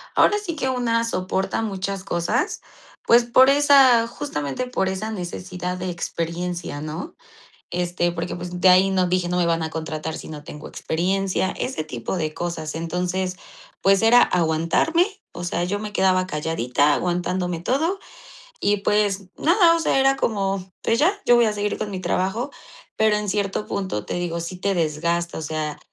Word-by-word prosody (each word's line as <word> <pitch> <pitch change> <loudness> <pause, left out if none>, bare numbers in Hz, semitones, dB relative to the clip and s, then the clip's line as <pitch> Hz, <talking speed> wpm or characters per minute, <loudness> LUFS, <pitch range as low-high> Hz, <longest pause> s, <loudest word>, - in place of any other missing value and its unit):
Ahora 415 - +5
sí 360 -6 -4
que 265 -3 -1
una 230 -2 +1
soporta 190 -1 -1
muchas 195 -2 -3
cosas, 210 - -1 0.4
pues, 235 +1 +5
por 260 +3 +6
esa 275 -5 +6
justamente 145 - -4
por 190 -6 -1
esa 200 +4 -3
necesidad 180 -1 -5
de 185 0 -4
experiencia, 170 -1 -4
¿no? 155 - -6 0.6
Este, 175 0 -1
porque, 170 0 -4
pues, 180 0 -6
de 185 - +6
ahí 185 +1 +6
no 185 -1 +2
dije: 180 0 0
"No 180 0 0
me 175 - +2
van 165 -1 +1
a 160 - -3
contratar 160 0 -4
si - - -9
no 150 -1 -8
tengo 150 - -9
experiencia", 190 +3 -1
ese 255 -11 -3
tipo 120 +6 -4
de 155 -2 -2
cosas. 165 -3 -4
Entonces, 180 +2 -2 0.5
pues, 195 +2 +4
era 240 +2 +7
aguantarme, 165 - +2 0.3
o 175 - -7
sea, 175 0 -1
yo 200 +3 -2
me 210 -1 -6
quedaba 185 -1 +2
calladita, 150 -3 +1
aguantándome 180 -1 -1
todo 320 - 0 0.6
y, 205 0 +2
pues, 200 -1 0
nada, 340 0 +4
o - - -2
sea, 285 - +2
era 270 0 +4
como: 195 -5 -1
"Pues 230 - +1
ya, 345 +7 +4
yo 240 - +6
voy 240 - +5
a 215 - +1
seguir 205 0 -2
con 210 - -3
mi 185 - -4
trabajo", 190 +8 -1 0.5
pero 215 -1 +3
en 210 0 -3
cierto 200 +1 -1
punto, 185 - -3
te - - -4
digo, 170 -1 -2
sí 170 +2 -5
te 200 0 0
desgasta, 170 +1 -1
o - - -5
sea, 155 0 -3
185 Hz, 175 wpm, -23 LUFS, 170-215 Hz, 0.6 s, era